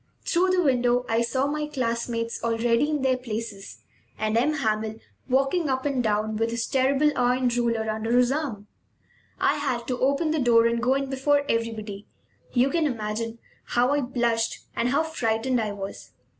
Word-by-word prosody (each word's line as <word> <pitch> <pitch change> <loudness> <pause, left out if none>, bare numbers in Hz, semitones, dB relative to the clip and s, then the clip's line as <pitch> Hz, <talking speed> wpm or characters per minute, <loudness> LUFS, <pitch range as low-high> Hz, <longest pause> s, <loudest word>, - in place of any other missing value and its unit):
Through 365 +2 +2
the 370 -1 +3
window 250 -3 +2
I 225 +1 +1
saw 260 +3 0
my 300 +1 -2
classmates, 235 -4 -2
already 230 +4 +1
in 300 -3 -1
their 260 -1 +2
places, 220 -5 -6 0.3
and 215 0 -1
M. 265 +7 +3
Hamel 220 -5 -1 0.3
walking 275 +5 +1
up 260 0 -1
and 275 -3 +1
down 215 0 0
with 225 +1 0
his 230 0 -2
terrible 275 +3 +2
iron 250 +1 +2
ruler 235 -2 0
under 220 +2 0
his 250 0 +4
arm. 270 -9 -3 0.7
I - - +2
had 245 -4 -2
to 250 - -1
open 280 +4 +1
the 315 - 0
door 235 -3 +4
and 235 0 +1
go 255 +3 +2
in 275 0 -1
before 285 +2 +2
everybody. 220 -4 -3 0.4
You 255 +2 +2
can 330 -3 +2
imagine 225 -2 -3 0.3
how 245 +2 +2
I 290 0 +2
blushed 235 -3 -1
and 240 - +1
how 280 +5 +2
frightened 245 -5 0
I 215 -1 -2
was. 200 -1 -7
245 Hz, 175 wpm, -25 LUFS, 225-275 Hz, 0.7 s, his